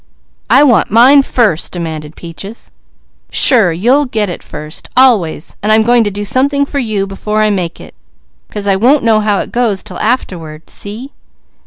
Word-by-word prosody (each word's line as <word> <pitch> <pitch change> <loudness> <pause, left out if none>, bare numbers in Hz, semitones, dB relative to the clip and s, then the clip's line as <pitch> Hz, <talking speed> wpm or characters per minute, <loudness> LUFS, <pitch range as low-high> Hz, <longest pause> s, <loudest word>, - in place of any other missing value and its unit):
"I 275 - +5
want 245 -7 +3
mine 255 +6 +6
first!" 220 - 0
demanded 160 -3 -6
Peaches. 195 +6 -9 0.6
"Sure! 225 -10 +4
You'll 250 - +1
get 215 -5 -2
it - - -7
first! 150 0 -9
Always! 210 - +2
But 210 - -2
I'm 220 0 +4
going 240 +1 +3
to - - 0
do 205 +1 -5
something 280 +5 +1
for 280 0 -4
you 215 -6 -2
before 210 +2 -2
I 215 - +2
make 180 -4 -3
it, - - -13 0.6
'cause 210 -1 -5
I 195 -1 +2
won't 255 +9 +2
know 225 -2 +3
how 210 -1 0
it - - -8
goes 230 -5 -1
'til - - -8
afterward. 165 -9 -3
See?" 225 +7 -7
215 Hz, 175 wpm, -13 LUFS, 185-245 Hz, 0.6 s, mine